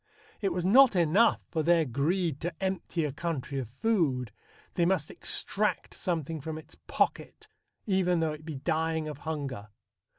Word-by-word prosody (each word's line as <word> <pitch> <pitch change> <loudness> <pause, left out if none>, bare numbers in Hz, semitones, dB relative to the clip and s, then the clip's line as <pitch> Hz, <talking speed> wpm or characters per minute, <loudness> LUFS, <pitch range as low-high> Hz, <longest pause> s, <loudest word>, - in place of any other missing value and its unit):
It 195 -2 +1
was 175 0 -2
not 245 +3 +7
enough 180 +7 +4
for 160 - 0
their 165 0 +3
greed 150 +4 0
to 175 - -2
empty 190 -3 -2
a 145 - -2
country 145 -3 -3
of 125 -4 -5
food; 135 - 0 0.4
they 175 - +1
must 170 -4 +1
extract 210 +1 0
something 165 -4 -3
from 155 +2 -5
its 160 - -12
pocket, - - -1 0.4
even 185 -4 +2
though 160 -1 0
it 155 0 -10
be 155 -2 -6
dying 160 +2 -1
of 150 -2 -6
hunger.... 135 -9 -4
160 Hz, 160 wpm, -29 LUFS, 150-180 Hz, 0.4 s, not